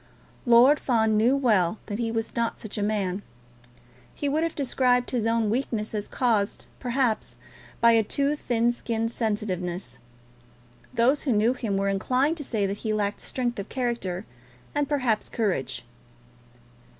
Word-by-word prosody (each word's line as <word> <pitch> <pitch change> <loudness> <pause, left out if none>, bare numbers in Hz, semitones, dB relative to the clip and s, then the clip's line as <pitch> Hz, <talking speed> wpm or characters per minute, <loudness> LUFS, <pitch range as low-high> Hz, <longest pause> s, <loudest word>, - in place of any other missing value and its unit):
Lord 250 +5 +7
Fawn 220 -4 +2
knew 235 +6 +4
well 215 -8 +2
that 205 0 -4
he 230 -1 0
was 225 0 -3
not 235 -1 -1
such 215 - -7
a 210 - -2
man. 205 -2 -1 0.9
He 290 - -2
would 295 +3 +1
have 330 -1 -1
described 250 -2 +1
his 235 -4 0
own 225 -2 +1
weakness 225 -3 -2
as 210 -1 -3
caused, 225 -5 0
perhaps, 245 -3 -1 0.5
by 235 - +7
a 225 -1 +5
too 280 +7 +1
thin 240 -4 +1
skinned 230 -1 -2
sensitiveness. 185 - -3 0.9
Those 255 +4 +3
who 275 - 0
knew 220 +4 +3
him 225 -6 -2
were 195 0 0
inclined 255 - +1
to 295 - -4
say 220 -6 0
that 195 +1 -2
he 220 0 -2
lacked 205 -1 -1
strength 240 -3 -2
of 200 - -6
character, 230 -7 -2 0.5
and, 290 -1 0
perhaps, 250 -7 0
courage. 135 - -2
230 Hz, 155 wpm, -26 LUFS, 210-250 Hz, 0.9 s, Lord